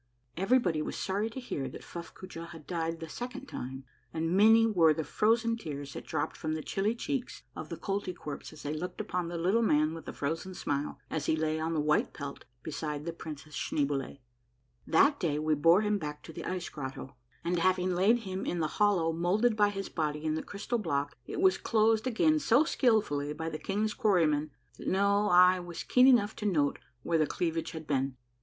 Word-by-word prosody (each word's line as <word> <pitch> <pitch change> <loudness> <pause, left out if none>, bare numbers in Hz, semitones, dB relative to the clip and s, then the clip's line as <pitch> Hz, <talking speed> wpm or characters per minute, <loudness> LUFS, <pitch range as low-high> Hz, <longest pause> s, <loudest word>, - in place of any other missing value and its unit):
Everybody 190 -4 +2
was - - -4
sorry 200 +3 -1
to 230 - -7
hear 140 - -4
that - - -10
Fuffcoojah 170 0 -8
had 165 -3 -11
died 165 -1 -2
the 165 - -6
second 245 +9 -6
time, 130 - -6 0.3
and 165 +2 -1
many 225 +3 +7
were 170 -8 +4
the 160 - -2
frozen 230 - +2
tears 145 -8 -6
that - - -8
dropped 145 -2 -2
from 155 0 -3
the 155 -1 -3
chilly 205 +4 0
cheeks 265 0 -4
of - - -7
the - - -5
Koltykwerps 185 -7 -4
as 155 - -12
they 145 - -2
looked 180 +4 -5
upon 180 -2 -2
the 170 0 -4
Little 190 +7 +2
Man 155 -7 +3
with 165 -2 -8
the - - -5
Frozen 165 +6 -3
Smile 145 -3 -2
as 155 -2 -2
he - - +3
lay 155 0 0
on 160 +1 -1
the - - +1
white 150 +1 +1
pelt 140 -1 -7 0.2
beside 150 -1 -4
the 170 - -3
Princess 155 -2 -9
Schneeboule. 140 -2 -1 0.7
That 280 - +4
day 155 -6 0
we 155 +1 +1
bore 165 +6 +5
him 210 -1 +1
back 150 -2 -6
to 160 - -10
the - - -7
ice 180 -1 -3
grotto, 135 -2 -7 0.3
and 170 +1 0
having 185 +1 +2
laid 205 +7 +3
him 190 -2 -4
in 175 - -2
the 155 - +1
hollow 180 -6 +3
moulded 200 +8 +2
by 205 -1 +4
his 195 -1 -4
body 150 -2 -2
in 155 - +1
the 160 - -1
crystal 230 +4 -3
block, 145 -7 -1
it - - -4
was 375 0 +4
closed 220 +1 +2
again 310 +6 +3
so 265 0 +4
skilfully 210 - +1
by 160 +2 -4
the 155 -1 -5
king's 210 +2 -1
quarrymen 160 - +2 0.3
that - - -7
no 200 +2 +3
eye 180 0 +6
was 175 -1 -6
keen 250 +1 +5
enough 220 -5 +4
to 210 - -2
note 150 -7 +1 0.2
where 165 -1 +1
the 155 - +3
cleavage 165 0 -2
had 160 -1 -7
been. 135 -2 -1
170 Hz, 205 wpm, -30 LUFS, 155-210 Hz, 0.7 s, many